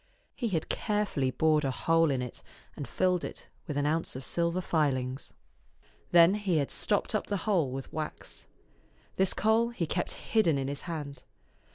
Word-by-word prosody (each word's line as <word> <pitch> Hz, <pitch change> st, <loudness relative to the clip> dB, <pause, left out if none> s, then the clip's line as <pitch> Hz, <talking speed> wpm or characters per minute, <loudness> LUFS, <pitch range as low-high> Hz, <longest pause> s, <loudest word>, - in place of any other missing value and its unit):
He 240 Hz, -, -2 dB
had 170 Hz, -7 st, -1 dB
carefully 205 Hz, -, 0 dB
bored 155 Hz, +3 st, +2 dB
a 135 Hz, -, +1 dB
hole 165 Hz, +4 st, +2 dB
in 130 Hz, -3 st, 0 dB
it, 125 Hz, -, -8 dB, 0.3 s
and 145 Hz, -, -6 dB
filled 180 Hz, -1 st, +1 dB
it -, -, -7 dB, 0.2 s
with 150 Hz, -, -3 dB
an 145 Hz, -, +1 dB
ounce 160 Hz, -1 st, 0 dB
of 130 Hz, -, -5 dB
silver 170 Hz, +4 st, 0 dB
filings. 135 Hz, -7 st, -1 dB, 0.8 s
Then 170 Hz, +1 st, +7 dB
he 205 Hz, -5 st, 0 dB
had 140 Hz, -2 st, 0 dB
stopped 205 Hz, +1 st, +1 dB
up 215 Hz, -, -1 dB
the 205 Hz, -, -1 dB
hole 180 Hz, -10 st, +2 dB
with 135 Hz, +1 st, -6 dB
wax. 150 Hz, -, -6 dB, 0.7 s
This 190 Hz, -1 st, +2 dB
coal 225 Hz, +2 st, +3 dB
he 235 Hz, -8 st, -2 dB
kept 175 Hz, +3 st, -2 dB
hidden 175 Hz, -10 st, +1 dB
in 135 Hz, -1 st, -2 dB
his 140 Hz, +1 st, -4 dB
hand. 145 Hz, -5 st, -5 dB
160 Hz, 175 wpm, -30 LUFS, 140-190 Hz, 0.8 s, Then